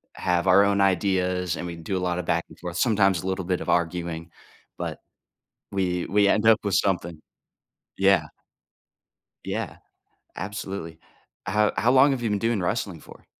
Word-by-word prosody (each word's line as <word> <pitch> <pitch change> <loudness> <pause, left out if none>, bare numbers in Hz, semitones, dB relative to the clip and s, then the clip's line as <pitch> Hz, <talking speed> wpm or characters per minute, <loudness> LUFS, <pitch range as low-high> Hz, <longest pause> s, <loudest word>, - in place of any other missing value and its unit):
have 90 0 0
our 95 +2 +6
own 100 0 +2
ideas 90 -2 +1
and 85 - -5
we 85 - -5
do 90 +4 -3
a - - -1
lot 90 0 -1
of 90 - -4
back 85 +1 +1
and - - -16
forth, 90 0 -6
sometimes 100 -6 +2
a - - -4
little 95 -1 -2
bit 90 -1 -1
of - - -5
arguing, 85 -1 -1 0.5
but - - -5 0.7
we 90 -3 -1
we 100 +1 +3
end 110 +2 +2
up 110 -1 +7
with 100 -2 0
something. 85 -4 0 0.8
Yeah. 95 -4 +4 1.2
Yeah, - - -4 0.6
absolutely. 95 -4 -6 0.5
How 105 +2 +2
how 120 - +3
long 135 +2 +6
have 130 -3 -2
you 115 - -1
been 105 - 0
doing 115 -1 0
wrestling 95 -2 -2
for? - - -15
95 Hz, 170 wpm, -25 LUFS, 85-100 Hz, 1.2 s, up